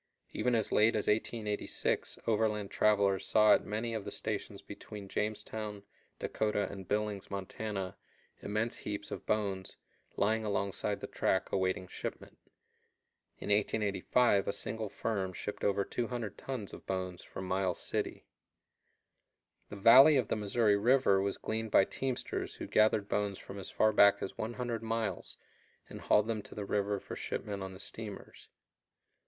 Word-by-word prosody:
Even 125 -1 +1
as 110 -2 0
late 110 +2 +4
as 105 - +1
1886 105 -1 -1
overland 105 -2 +1
travelers 100 -3 +3
saw 105 -1 +6
at - - +3
many 110 +3 -3
of 110 -2 -3
the - - -5
stations - - -4
between 105 -2 -9
Jamestown, 105 0 -3 0.3
Dakota, 105 -1 -1
and 95 -2 -8
Billings, 105 -1 -1
Montana, 100 0 -4 0.5
immense 110 +3 -1
heaps 105 -1 -5
of - - -6
bones 100 -3 -1 0.4
lying 110 +2 +2
alongside 100 0 -1
the - - -3
track 95 - 0
awaiting 95 -1 0
shipment. - - -7 1.0
In - - -6
1885 105 +1 +2
a - - +2
single 110 0 -3
firm 95 -4 -2
shipped 105 - -5
over 100 -1 +2
200 120 -3 -3
tons 125 -7 -5
of - - -11
bones 90 -1 -3
from 95 - -7
Miles 95 0 0
City. - - -2 1.4
The - - -7
valley 130 +9 +8
of 125 - 0
the - - +1
Missouri 105 0 +2
River 115 -3 +4
was 100 0 -1
gleaned 110 0 -3
by 95 - +6
teamsters 130 -2 -3
who - - -6
gathered 110 -1 +3
bones 100 -2 -1
from 100 - -9
as 95 - -7
far 110 0 +3
back 100 0 +7
as - - -4
100 120 0 -3
miles 110 -5 -3 0.5
and - - -9
hauled 105 - +4
them 110 -1 -2
to - - -11
the 105 - -4
river 100 0 0
for - - -8
shipment 100 -2 -4
on 95 0 -5
the - - -11
steamers. 105 -1 -8
105 Hz, 150 wpm, -32 LUFS, 100-110 Hz, 1.4 s, valley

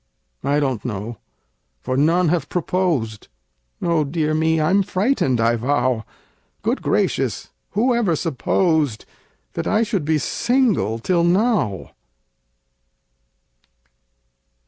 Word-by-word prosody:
I 140 +2 +2
don't 130 -6 -1
know 110 0 -5 0.6
for 130 - -3
none 165 +5 +3
have 170 0 0
proposed 165 - -1 0.6
Oh, 170 -2 +2
dear 155 +1 -1
me! 160 +1 +2
I'm 180 +6 +3
frightened, 190 - +1
I 115 +1 +3
vow! 125 -2 0 0.6
Good - - 0
gracious! - - -1 0.2
who 245 +5 +2
ever 215 -8 +1
supposed 155 - 0 0.5
That - - -3
I 215 +2 +2
should 210 -7 -1
be 155 +1 +1
single 225 - +1
till 170 +9 +1
now? 180 - +1
160 Hz, 105 wpm, -21 LUFS, 130-185 Hz, 0.6 s, none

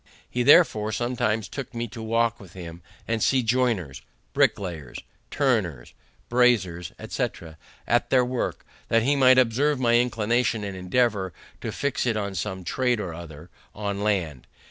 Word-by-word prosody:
He 125 - -2
therefore 110 -3 +5
sometimes 110 -3 -1
took 135 +1 -7
me 120 0 -2
to 115 +1 -8
walk 115 +1 0
with 95 -3 -14
him, 85 -2 -9 0.3
and 115 -1 -1
see 130 +2 +3
joiners, 115 - 0 0.3
bricklayers, 85 -9 0 0.3
turners, 110 - -1 0.3
braziers, 105 -9 +2
etc., 80 -2 -4 0.3
at - - +1
their 125 -1 +4
work, 125 0 -3 0.2
that 115 0 +3
he 140 +4 +2
might 130 -2 +6
observe 130 +4 +2
my 120 -2 +4
inclination, 120 -1 0
and 100 -1 -5
endeavor 95 0 0 0.3
to - - -4
fix 140 -2 -1
it 115 -2 +1
on 100 -2 -3
some 95 +1 -4
trade 125 +4 0
or 90 -5 -4
other 80 0 -10 0.2
on 100 -1 -3
land. 90 -11 -1
110 Hz, 150 wpm, -25 LUFS, 95-125 Hz, 0.3 s, might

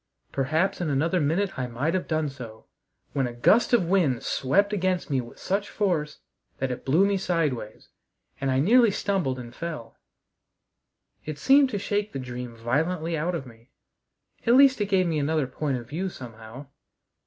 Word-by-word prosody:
Perhaps 160 +9 0
in 170 - -1
another 160 +6 +1
minute 165 +4 0
I 125 - -1
might 135 +7 -2
have 185 - -1
done 155 -1 0
so, 120 -6 -9 0.5
when 135 -3 0
a 120 - -6
gust 195 - +3
of 235 -8 +4
wind 165 -10 +1
swept 200 +10 +1
against 185 -4 -1
me 135 -2 +2
with 120 - -12
such 200 +2 -2
force 170 -8 -1 0.4
that 135 -1 -2
it 125 - -5
blew 160 +9 +4
me 200 0 +1
sideways, 155 - -2 0.5
and 135 - -1
I 130 - +2
nearly 230 - +5
stumbled 190 -10 -1
and 120 -1 -9
fell. 155 -6 -7 1.2
It 155 -1 -6
seemed 275 - +5
to 210 - -2
shake 205 +1 -2
the - - -3
dream 125 -2 -6
violently 160 +8 -1
out 170 +3 -1
of 140 - -4
me. 115 0 -16 0.8
At 235 - +6
least 265 -3 +6
it 205 - +1
gave 190 -2 +2
me 160 -3 0
another 150 0 +1
point 135 +1 -2
of 120 -1 -9
view 185 +6 -2
somehow. 115 -1 -10
155 Hz, 175 wpm, -26 LUFS, 130-190 Hz, 1.2 s, At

